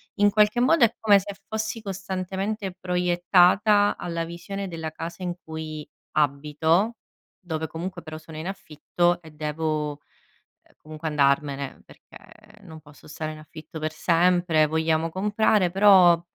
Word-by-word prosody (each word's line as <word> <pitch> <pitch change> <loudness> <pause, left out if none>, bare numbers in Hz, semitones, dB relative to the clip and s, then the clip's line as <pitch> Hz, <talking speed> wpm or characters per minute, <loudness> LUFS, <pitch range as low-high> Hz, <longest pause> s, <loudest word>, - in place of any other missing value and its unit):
In 205 -1 +4
qualche 210 +3 +3
modo 265 0 +5
è 225 - -1
come 205 -2 +5
se 200 +1 -7
fossi 220 +1 -3
costantemente 195 +1 -4
proiettata, 180 +3 +3
alla 170 -1 -3
visione 195 +4 -6
della 160 -2 -5
casa 170 +3 -7
in 175 - -2
cui 155 -1 -7 0.3
abito, 155 - +1 0.4
dove 160 -3 -4
comunque 175 +2 -6
però 155 -1 -8
sono 160 0 -11
in 160 - -5
affitto, 175 -1 -1
e 160 -1 -14
devo 150 -1 -3 0.8
comunque 155 +1 -8
andarmene, 140 -1 0
perché 215 - -18
non 160 -3 -11
posso 145 0 -17
stare 155 0 -5
in 155 - -11
affitto 155 +2 -11
per 155 0 -2
sempre, 170 -2 +2
vogliamo 160 +1 0
comprare, 205 0 +1
però, 190 -4 +6
170 Hz, 135 wpm, -25 LUFS, 155-195 Hz, 0.8 s, però